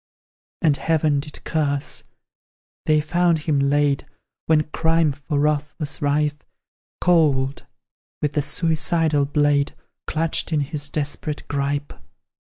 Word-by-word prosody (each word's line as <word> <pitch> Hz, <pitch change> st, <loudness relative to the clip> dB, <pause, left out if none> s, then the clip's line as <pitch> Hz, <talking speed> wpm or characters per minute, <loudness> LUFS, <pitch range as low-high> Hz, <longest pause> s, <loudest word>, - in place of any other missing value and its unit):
And 150 Hz, -4 st, +4 dB
heaven 155 Hz, -3 st, +1 dB
did 150 Hz, +1 st, -9 dB
curse 145 Hz, -3 st, -1 dB, 0.8 s
they 155 Hz, -1 st, +4 dB
found 170 Hz, +2 st, +2 dB
him 150 Hz, -2 st, 0 dB
laid, 140 Hz, 0 st, +2 dB, 0.4 s
When 155 Hz, -1 st, +4 dB
crime 160 Hz, 0 st, +1 dB
for 145 Hz, +1 st, -4 dB
wrath 150 Hz, 0 st, 0 dB
was 150 Hz, -3 st, -3 dB
rife, 145 Hz, +1 st, +1 dB, 0.6 s
Cold 145 Hz, -6 st, +2 dB, 0.5 s
with 150 Hz, -, 0 dB
the 150 Hz, 0 st, 0 dB
suicidal 155 Hz, 0 st, +1 dB
blade 145 Hz, -1 st, +2 dB, 0.3 s
Clutched 160 Hz, +1 st, 0 dB
in 155 Hz, -2 st, +2 dB
his 145 Hz, 0 st, -3 dB
desperate 145 Hz, 0 st, -4 dB
gripe. 145 Hz, 0 st, -2 dB
150 Hz, 115 wpm, -22 LUFS, 145-155 Hz, 0.8 s, And